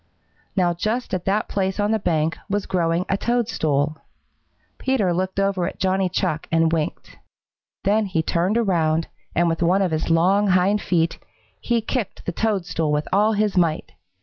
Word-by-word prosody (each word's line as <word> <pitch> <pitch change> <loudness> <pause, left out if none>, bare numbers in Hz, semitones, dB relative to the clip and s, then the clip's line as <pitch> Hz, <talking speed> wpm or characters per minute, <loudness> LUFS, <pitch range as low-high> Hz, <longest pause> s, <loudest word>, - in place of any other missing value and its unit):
Now 180 -3 +2
just 215 +8 -2
at 185 -2 -2
that 205 +2 +1
place 190 0 -2
on 205 +1 +1
the 220 - +2
bank 160 -4 0
was 205 0 -1
growing 170 0 0
a 195 - 0
toadstool. 155 - 0 0.8
Peter 230 -9 +1
looked 185 +2 -2
over 195 -3 +1
at - - -6
Johnny 190 0 +1
Chuck 155 -2 -1
and 165 0 +3
winked. 155 -2 -3 0.7
Then 210 +1 +2
he 165 -4 0
turned 180 +7 +1
around, 165 -7 +1 0.3
and 175 +1 +3
with 165 0 -1
one 185 +3 +3
of 180 - 0
his 155 +1 -1
long 185 +5 +3
hind 190 +2 +3
feet, 165 -2 0 0.4
he 235 -1 0
kicked 225 -1 -4
the - - -1
toadstool 175 -6 -1
with 150 0 0
all 210 +3 +4
his 210 -1 0
might. 165 -3 +1
185 Hz, 170 wpm, -22 LUFS, 165-205 Hz, 0.8 s, all